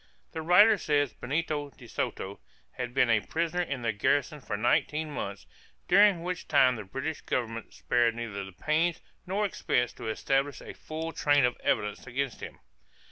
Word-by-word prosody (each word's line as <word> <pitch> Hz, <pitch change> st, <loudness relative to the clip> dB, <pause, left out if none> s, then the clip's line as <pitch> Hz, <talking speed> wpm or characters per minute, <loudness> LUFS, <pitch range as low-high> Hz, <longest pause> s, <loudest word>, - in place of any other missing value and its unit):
The 160 Hz, -, -4 dB
writer 200 Hz, +6 st, +6 dB
says 145 Hz, -5 st, +1 dB
Benito 145 Hz, +1 st, -2 dB
de 130 Hz, -, -16 dB
Soto 100 Hz, -3 st, -4 dB, 0.3 s
"had 125 Hz, -1 st, -5 dB
been 125 Hz, -2 st, +3 dB
a 110 Hz, -, +5 dB
prisoner 170 Hz, +8 st, -1 dB
in 140 Hz, -7 st, -3 dB
the 115 Hz, -1 st, 0 dB
garrison 145 Hz, +8 st, 0 dB
for 100 Hz, -, -4 dB
nineteen 150 Hz, +7 st, +1 dB
months, 100 Hz, -, -5 dB, 0.4 s
during 195 Hz, -2 st, +5 dB
which 180 Hz, 0 st, -4 dB
time 125 Hz, -1 st, +5 dB
the 110 Hz, -, -6 dB
British 135 Hz, +11 st, -4 dB
Government 115 Hz, -2 st, -3 dB
spared 120 Hz, -1 st, +1 dB
neither 110 Hz, -4 st, -4 dB
the 95 Hz, -, -9 dB
pains 155 Hz, -, 0 dB, 0.3 s
not 200 Hz, +3 st, 0 dB
expense 125 Hz, -, 0 dB
to -, -, -8 dB
establish 135 Hz, +5 st, 0 dB
a -, -, -9 dB
full 160 Hz, +1 st, -5 dB
train 145 Hz, -4 st, +3 dB
of 125 Hz, -, 0 dB
evidence 105 Hz, +4 st, -1 dB
against 130 Hz, +1 st, -3 dB
him. -, -, -8 dB
140 Hz, 170 wpm, -29 LUFS, 120-160 Hz, 0.4 s, writer